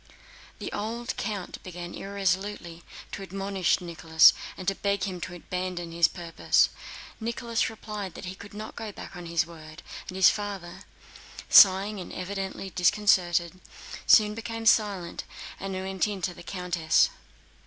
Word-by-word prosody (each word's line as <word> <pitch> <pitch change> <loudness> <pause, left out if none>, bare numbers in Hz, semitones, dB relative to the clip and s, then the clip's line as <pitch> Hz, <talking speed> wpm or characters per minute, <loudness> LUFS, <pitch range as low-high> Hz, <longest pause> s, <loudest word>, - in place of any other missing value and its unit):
The - - -6
old 235 +4 -3
count 205 -4 -4
began 175 -1 -7
irresolutely 195 -3 -2 0.3
to - - -6
admonish 195 -1 0
Nicholas 165 -2 +5 0.2
and 190 +1 -2
beg 200 -2 0
him 180 -2 -3
to 175 - -5
abandon 180 -1 -4
his 170 -1 +4
purpose. 170 0 +1 0.5
Nicholas 230 0 -1
replied 210 -4 -6
that - - -8
he 180 - -5
could 205 +2 -12
not 215 +1 -7
go 220 -2 -5
back 195 - -10
on 175 -1 -8
his 170 0 +1
word, 155 -2 -12 0.3
and 185 - -6
his 190 -1 +7
father, 200 -5 -6 0.6
sighing 195 +1 +7
and 180 - -7
evidently 195 0 -5
disconcerted, 175 -2 +3
very 185 - -22 0.5
soon 210 -1 +6
became 225 0 -5
silent 200 -6 +2 0.4
and 195 0 -4
went 190 +1 -1
in 205 -2 -4
to 180 - -1
the - - -12
countess. 175 - +1
190 Hz, 145 wpm, -27 LUFS, 175-205 Hz, 0.6 s, his